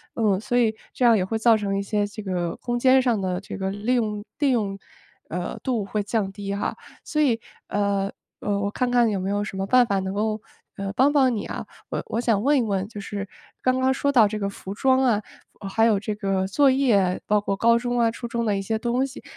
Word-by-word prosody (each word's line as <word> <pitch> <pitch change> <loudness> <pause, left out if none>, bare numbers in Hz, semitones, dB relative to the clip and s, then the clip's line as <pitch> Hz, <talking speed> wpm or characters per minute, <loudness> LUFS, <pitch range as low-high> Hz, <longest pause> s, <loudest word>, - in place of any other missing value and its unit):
嗯， 210 -4 +2
所 245 +3 0
以 225 -3 +3 0.2
这 250 - +1
样 230 -1 +7
也 190 - +2
会 220 +4 -2
造 225 0 +5
成 200 -2 -1
一 - - 0
些 205 +1 0
这 210 +1 -8
个 180 -3 -2
空 240 0 -2
间 260 +1 +5
上 235 -6 +1
的 180 -1 -1
这 195 - -8
个 190 -1 -2
利 205 +5 -1
用 215 -3 -1 0.2
利 285 -2 +3
用， 205 -5 0 0.5
呃， 175 +2 -4
度 235 -6 -1
会 210 +1 -2
降 205 -1 -1
低 200 -1 -4
哈。 200 - -2 0.3
所 305 -1 0
以， 235 -6 +3 0.3
呃 200 -1 0 0.3
呃， 200 -1 0
我 200 - -1
看 250 +1 -1
看 240 -2 +4
有 205 - -1
没 185 +1 -2
有 205 0 0
什 200 - -6
么 195 0 -2
办 250 +3 +5
法 200 -1 +1
能 190 0 -3
够， 215 +1 -1 0.3
呃， 195 -1 -4
帮 275 +5 +3
帮 265 -4 +4
你 210 - -3
啊。 - - -5 0.2
我 - - -3
我 225 - -2
想 225 -3 +1
问 290 +1 +4
一 255 - +3
问 195 -4 -1
就 210 - -8
是 200 -1 -5 0.3
刚 255 0 +2
刚 260 0 +3
说 280 +1 0
到 230 -6 +6
这 215 +1 -4
个 200 0 -1
服 195 -1 -8
装 260 +4 +3
啊， 225 -5 +3 0.5
还 225 +3 +3
有 220 -3 +4
这 215 +2 -3
个 195 -2 -1
作 275 +8 +4
业， 220 -9 +2
包 210 0 +3
括 200 -1 -2
高 230 +3 +4
中 245 0 -2
啊， 230 -1 +3
初 235 +1 -6
中 235 0 -2
的 205 -2 +1
一 195 - -2
些 220 +3 -1
东 245 +4 0
西， 265 - -11
215 Hz, 265 characters per minute, -24 LUFS, 200-245 Hz, 0.5 s, 样